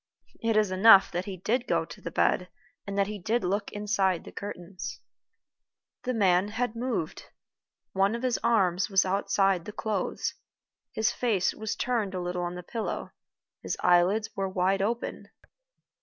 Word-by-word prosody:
It 225 Hz, -1 st, +1 dB
is 210 Hz, -3 st, +3 dB
enough 195 Hz, +1 st, +7 dB
that 180 Hz, +1 st, -2 dB
he 195 Hz, -2 st, -6 dB
did 235 Hz, +7 st, -1 dB
go -, -, +1 dB
to -, -, -12 dB
the -, -, -5 dB
bed, -, -, +1 dB, 0.4 s
and 200 Hz, 0 st, -4 dB
that 200 Hz, -, +3 dB
he 210 Hz, 0 st, -6 dB
did 225 Hz, +6 st, 0 dB
look 200 Hz, +3 st, -1 dB
inside 200 Hz, -4 st, 0 dB
the -, -, -10 dB
curtains. 190 Hz, -2 st, -7 dB, 1.1 s
The 255 Hz, -, 0 dB
man 190 Hz, -2 st, +3 dB
had 235 Hz, +2 st, -2 dB
moved. 230 Hz, -9 st, -3 dB, 0.7 s
One 195 Hz, +3 st, +2 dB
of 235 Hz, -, -6 dB
his 250 Hz, -2 st, +1 dB
arms 190 Hz, -5 st, +2 dB
was 195 Hz, -1 st, +4 dB
outside 195 Hz, -2 st, +1 dB
the -, -, -6 dB
clothes; 210 Hz, -2 st, -2 dB, 0.6 s
his 220 Hz, 0 st, +1 dB
face 215 Hz, -7 st, +1 dB
was 220 Hz, -1 st, -4 dB
turned 220 Hz, -6 st, -1 dB
a -, -, -2 dB
little 180 Hz, 0 st, -3 dB
on 175 Hz, 0 st, -3 dB
the 180 Hz, -, -7 dB
pillow; 225 Hz, +5 st, -4 dB, 0.5 s
his -, -, -3 dB
eyelids 185 Hz, +5 st, +3 dB
were 195 Hz, -1 st, -1 dB
wide 190 Hz, +1 st, +1 dB
open. 230 Hz, +4 st, -3 dB
200 Hz, 165 wpm, -28 LUFS, 185-220 Hz, 1.1 s, enough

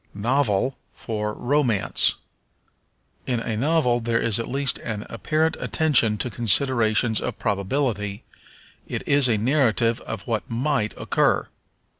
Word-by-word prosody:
Novel 125 Hz, +2 st, +1 dB, 0.2 s
for 105 Hz, -2 st, -4 dB
Romance. 125 Hz, -6 st, +1 dB, 1.1 s
In 125 Hz, -2 st, 0 dB
a 115 Hz, -1 st, -3 dB
novel 125 Hz, -1 st, +1 dB
there 115 Hz, 0 st, 0 dB
is 115 Hz, -1 st, +2 dB
at 115 Hz, -, -4 dB
least 135 Hz, +1 st, -1 dB
an 110 Hz, -2 st, -5 dB
apparent 155 Hz, +7 st, 0 dB
attention 125 Hz, -9 st, +3 dB
to 125 Hz, -, -3 dB
considerations 115 Hz, 0 st, +2 dB
of -, -, -4 dB
probability; 105 Hz, 0 st, -2 dB, 0.6 s
it -, -, -5 dB
is 140 Hz, -3 st, +4 dB
a 110 Hz, -, +2 dB
narrative 115 Hz, -1 st, +1 dB
of 110 Hz, -3 st, -5 dB
what 115 Hz, -3 st, -3 dB
might 120 Hz, -2 st, -1 dB
occur. -, -, +1 dB
115 Hz, 125 wpm, -23 LUFS, 110-135 Hz, 1.1 s, is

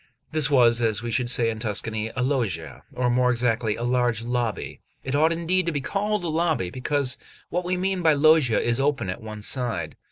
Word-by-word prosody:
This 155 Hz, -2 st, +2 dB
was, 120 Hz, -4 st, +4 dB
as 115 Hz, -1 st, 0 dB
we 120 Hz, -, -3 dB
should 120 Hz, +1 st, 0 dB
say 115 Hz, -2 st, +4 dB
in 110 Hz, -, -7 dB
Tuscany, 110 Hz, 0 st, -3 dB
a 125 Hz, -, 0 dB
loggia, 115 Hz, -, -2 dB
or, 125 Hz, 0 st, 0 dB
more 125 Hz, +1 st, +2 dB
exactly, 120 Hz, -3 st, +1 dB
a 120 Hz, -, -5 dB
large 120 Hz, -2 st, 0 dB
lobby; 120 Hz, -2 st, -3 dB, 0.2 s
it 130 Hz, -, -4 dB
ought 155 Hz, +3 st, +3 dB
indeed 170 Hz, +2 st, 0 dB
to -, -, +1 dB
be 145 Hz, -, -2 dB
called 205 Hz, +7 st, -2 dB
a -, -, -2 dB
lobby, 160 Hz, -, 0 dB
because 130 Hz, +2 st, -1 dB, 0.3 s
what 180 Hz, +1 st, -1 dB
we 180 Hz, +1 st, -1 dB
mean 190 Hz, 0 st, -1 dB
by 160 Hz, -2 st, +4 dB
loggia 150 Hz, -5 st, +4 dB
is 120 Hz, +1 st, 0 dB
open 135 Hz, -8 st, 0 dB
at -, -, -7 dB
one 110 Hz, -1 st, -8 dB
side. 115 Hz, -, 0 dB
125 Hz, 210 wpm, -24 LUFS, 115-155 Hz, 0.3 s, was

